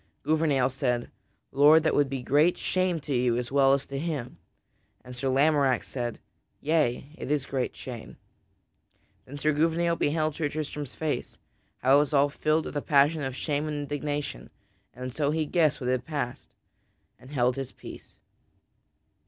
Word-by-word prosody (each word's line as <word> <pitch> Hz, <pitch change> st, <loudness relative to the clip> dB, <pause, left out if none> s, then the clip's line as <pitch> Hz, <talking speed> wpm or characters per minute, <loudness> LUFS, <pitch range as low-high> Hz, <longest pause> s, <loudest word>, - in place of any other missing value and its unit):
Gouvernail 145 Hz, -4 st, +2 dB
said, 125 Hz, -3 st, -1 dB, 0.4 s
"Lord, 150 Hz, +3 st, +6 dB
that 160 Hz, -, +2 dB
would 145 Hz, -2 st, +2 dB
be 135 Hz, -2 st, -4 dB
great 150 Hz, +7 st, +3 dB
shame 185 Hz, -2 st, 0 dB
to 145 Hz, -, -4 dB
you 120 Hz, -1 st, +2 dB
as 125 Hz, 0 st, -4 dB
well 135 Hz, -1 st, +5 dB
as 140 Hz, 0 st, 0 dB
to 135 Hz, 0 st, -5 dB
him." 145 Hz, -6 st, -4 dB, 0.7 s
And 125 Hz, 0 st, -9 dB
Sir 130 Hz, +2 st, -1 dB
Tristram 140 Hz, -1 st, +3 dB
said, 120 Hz, -3 st, -4 dB, 0.4 s
"Yea, 145 Hz, -3 st, 0 dB
it -, -, -5 dB
is 145 Hz, -2 st, 0 dB
great 130 Hz, -3 st, -2 dB
shame." 120 Hz, -4 st, -9 dB, 1.1 s
Then 140 Hz, -, -10 dB
Gouvernail 160 Hz, +4 st, +1 dB
beheld 155 Hz, +1 st, 0 dB
Sir 150 Hz, -1 st, -2 dB
Tristram's 150 Hz, -2 st, -5 dB
face, 155 Hz, -2 st, -3 dB, 0.5 s
how 135 Hz, +2 st, +6 dB
it -, -, +6 dB
was 145 Hz, 0 st, 0 dB
all 140 Hz, 0 st, +4 dB
filled 155 Hz, +2 st, 0 dB
with -, -, -7 dB
a -, -, -1 dB
passion 145 Hz, +3 st, +3 dB
of 135 Hz, -2 st, -3 dB
shame 150 Hz, +1 st, -2 dB
and 150 Hz, -1 st, -3 dB
indignation, 145 Hz, -, -4 dB, 0.4 s
and 125 Hz, 0 st, -7 dB
so 145 Hz, 0 st, 0 dB
he 155 Hz, +1 st, 0 dB
guessed 155 Hz, -2 st, +2 dB
what 125 Hz, -1 st, -1 dB
had 130 Hz, -1 st, 0 dB
passed, 145 Hz, -6 st, -4 dB, 0.7 s
and 130 Hz, -, -15 dB
held 125 Hz, -3 st, +1 dB
his 135 Hz, -2 st, -5 dB
peace. -, -, -12 dB
145 Hz, 165 wpm, -27 LUFS, 130-155 Hz, 1.1 s, Lord